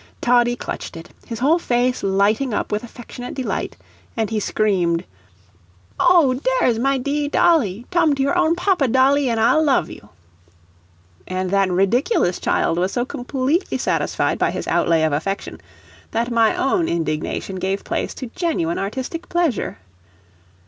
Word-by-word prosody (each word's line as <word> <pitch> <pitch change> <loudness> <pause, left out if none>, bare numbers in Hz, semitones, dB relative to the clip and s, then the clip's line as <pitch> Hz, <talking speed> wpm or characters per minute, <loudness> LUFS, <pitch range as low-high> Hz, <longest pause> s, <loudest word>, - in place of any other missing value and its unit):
Toddie 240 0 +3
clutched 205 - -6
it, 165 - -11 0.2
his 230 - -5
whole 295 +9 +3
face 250 -3 0
lighting 205 +5 +1
up - - -2
with 210 +2 -1
affectionate 245 +1 -9
delight, 260 -3 -3 0.4
and 225 -1 -1
he 220 - 0
screamed: 185 -6 0 1.0
"Oh, 335 -7 +5
dare - - +1
is 230 -2 +1
my 275 +2 +1
dee 285 +3 -1
dolly: 245 - +2
tum 335 -5 +3
to 275 - 0
your 280 +6 +1
own 340 -2 +3
papa, 355 -5 +1
dolly, 265 +2 +3
an' 230 - 0
I'll 235 +8 +3
love 270 - +1
you." 105 - -12 1.2
And 185 0 -3
that 195 -1 +2
ridiculous 195 - +1
child 165 - 0
was 185 +2 0
so 245 - 0
completely 265 +7 -1
satisfied - - -1
by - - +2
his - - -5
outlay 165 -1 +2
of 155 -2 +1
affection 195 +7 -3 0.5
that 235 +2 -2
my 230 -1 +3
own 330 +5 +1
indignation 165 +3 -2
gave 190 +2 -2
place - - -3
to 255 -4 -7
genuine 310 - -1
artistic 260 - -5
pleasure. 345 -9 -1
245 Hz, 155 wpm, -20 LUFS, 195-280 Hz, 1.2 s, Oh